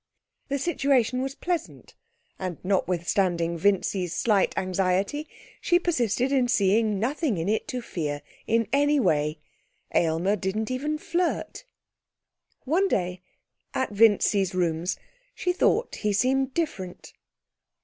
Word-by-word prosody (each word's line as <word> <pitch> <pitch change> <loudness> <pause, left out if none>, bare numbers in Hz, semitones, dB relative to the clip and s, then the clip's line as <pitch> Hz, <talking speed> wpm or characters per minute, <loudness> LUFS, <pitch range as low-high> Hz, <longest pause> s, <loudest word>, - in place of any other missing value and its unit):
The 280 - -1
situation 275 -5 +1
was 270 +1 -3
pleasant 350 +1 -4 0.5
and 185 -4 -4
notwithstanding 175 -2 +1
Vincy's 185 -1 +1
slight 205 0 +2
anxiety, 190 - 0 0.3
she 350 - +3
persisted 255 - 0
in 260 -3 +3
seeing 210 0 +2
nothing 260 - 0
in 165 +2 -2
it 220 +6 0
to 255 -5 -4
fear 145 -8 -4 0.2
in 230 0 +2
any 290 +1 +3
way. 150 - +1 0.6
Aylmer 170 +5 +2
didn't 210 +4 -2
even 295 +4 -1
flirt. 350 +9 -2 1.0
One 350 +9 +2
day, 180 - -1 0.5
at 260 - 0
Vincy's 205 -3 +3
rooms, 170 0 0 0.4
she 360 - 0
thought 450 +6 +1
he 210 -1 0
seemed 265 +5 +1
different. 190 - -4
215 Hz, 120 wpm, -26 LUFS, 185-275 Hz, 1.0 s, she